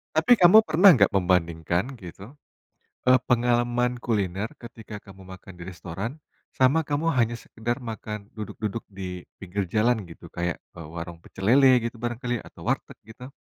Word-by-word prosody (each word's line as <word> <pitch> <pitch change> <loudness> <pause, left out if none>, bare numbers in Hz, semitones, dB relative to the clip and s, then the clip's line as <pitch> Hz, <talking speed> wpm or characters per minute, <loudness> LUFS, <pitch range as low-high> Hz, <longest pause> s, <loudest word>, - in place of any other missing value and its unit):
Tapi 245 - +5
kamu 185 +1 +8
pernah 180 +5 +7
nggak 105 - +4
membandingkan, 90 - 0
gitu, 100 - -11 0.7
e 130 - +8
pengalaman 120 0 +1
kuliner 105 -4 -2
ketika 115 -3 -10
kamu 95 -1 -15
makan 95 0 -12
di 85 - -9
restoran, 95 - -6 0.3
sama 140 +5 +3
kamu 150 +3 -1
hanya 120 -1 +2
sekedar 120 +1 -4
makan 110 -3 -7
duduk-duduk 105 +1 -5
di 90 -2 -7 0.2
pinggir 95 +1 -3
jalan, 110 -1 +2
gitu. 85 0 -13
Kayak 85 0 -3 0.2
e - - -9
warung 85 +2 -7
pecel 95 +2 -5
lele, 130 -1 +6
gitu, 115 - -14
barang 120 +1 -4
kali 120 -1 -1
atau - - -15
warteg, - - -2
gitu? 125 +4 -11
110 Hz, 155 wpm, -25 LUFS, 95-125 Hz, 0.7 s, kamu